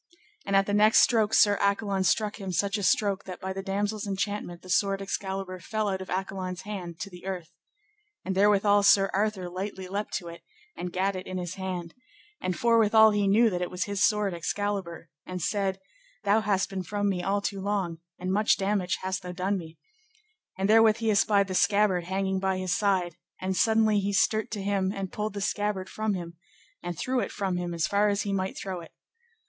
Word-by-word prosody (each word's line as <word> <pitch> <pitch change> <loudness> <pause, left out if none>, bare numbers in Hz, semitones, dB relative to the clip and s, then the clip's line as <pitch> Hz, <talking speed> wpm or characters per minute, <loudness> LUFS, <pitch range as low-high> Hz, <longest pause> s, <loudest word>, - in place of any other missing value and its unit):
And 200 - +1
at 195 0 +5
the 205 - -2
next 210 +1 +6
stroke 220 -3 +3
Sir 205 -2 +5
Accolon 200 -1 +1
struck 210 +2 +1
him 190 -1 -4
such 200 +3 0
a - - -4
stroke 200 0 +1
that 185 -2 -7
by 190 0 -4
the 195 - -4
damosel's 205 +2 -2
enchantment 195 -3 -3
the - - -12
sword 195 +1 +2
Excalibur 195 -1 -4
fell 215 +4 -2
out 190 -1 -2
of 190 - -8
Accolon's 185 -1 -3
hand 180 -5 -6
to 200 - -5
the 180 +1 -11
earth. 180 -4 -5 0.7
And 190 - -1
therewithal 205 +1 +4
Sir 195 -1 +5
Arthur 200 -2 0
lightly 190 +1 -5
leapt 205 +3 -3
to 175 - -4
it, 170 0 -9 0.3
and 180 - -5
gat 190 +2 0
it 185 0 -6
in 185 - -4
his 175 -1 -4
hand, 185 -3 -5 0.5
and 185 -1 -2
forthwithal 220 -2 +5
he 205 -1 +1
knew 220 +3 +4
that 180 -1 -2
it 180 - -2
was 180 0 -2
his 200 -1 -1
sword 205 -1 +2
Excalibur, 185 0 -3 0.2
and 185 0 -4
said, 195 +1 -1 0.4
Thou 205 +2 +3
hast 200 -2 0
been 190 -1 -3
from 205 +2 -2
me 190 -3 0
all 200 +2 0
too 200 -1 -3
long, 190 -5 -2 0.2
and 185 +1 -2
much 210 +2 +3
damage 195 -2 0
hast 190 0 -2
thou 180 0 -7
done 190 +3 -1
me; 165 -1 -11 0.8
and 190 +1 0
therewith 220 0 +5
he 225 -1 +1
espied 200 -1 +3
the 190 - -4
scabbard 200 -2 +2
hanging 190 +1 -1
by 190 0 0
his 185 -1 -1
side, 185 -5 0 0.2
and 190 0 -2
suddenly 220 0 +3
he 200 +1 -1
sterte 215 +2 +2
to 205 -3 -4
him 195 -1 0
and 195 -2 -5
pulled 210 -1 -3
the 200 - -3
scabbard 205 -2 -1
from 215 -2 -2
him, 170 -2 -7 0.4
and 175 -1 -5
threw 255 0 0
it - - -2
from 190 -3 -2
him 175 -1 -3
as 165 -2 0
far 205 +1 +2
as 200 0 0
he 200 - -2
might 190 0 -2
throw 190 -2 -4
it. 165 - -14
195 Hz, 210 wpm, -27 LUFS, 185-205 Hz, 0.8 s, next